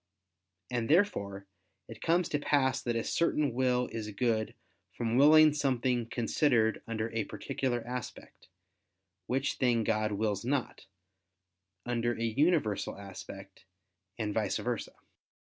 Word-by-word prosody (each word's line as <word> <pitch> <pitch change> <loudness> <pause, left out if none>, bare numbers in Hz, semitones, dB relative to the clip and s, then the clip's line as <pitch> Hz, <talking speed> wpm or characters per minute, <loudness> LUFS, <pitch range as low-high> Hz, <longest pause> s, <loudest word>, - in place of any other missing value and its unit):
And 120 -1 -1
therefore 100 - +1 0.4
it 115 0 -11
comes 170 +1 +2
to 145 - 0
pass 135 -3 +1
that 120 -1 -2
a 115 - 0
certain 150 -5 +1
will 125 0 +1
is 110 -2 -5
good 110 +1 -1 0.4
from 115 -1 -1
willing 155 +3 +7
something 125 -4 0
considered 115 -1 +1
under 115 0 -3
a 110 -2 -1
particular 120 -3 -3
aspect, 125 -1 -7 0.8
which 135 +2 -1
thing 120 -3 +2
God 110 -1 0
wills 105 -1 -1
not, 130 -6 -2 1.0
under 120 0 0
a 115 - -4
universal 115 - +1
aspect, 95 -1 -10 0.5
and 105 -3 -2
vice 105 -2 0
versa. 120 -3 -3
120 Hz, 125 wpm, -31 LUFS, 110-135 Hz, 1.0 s, willing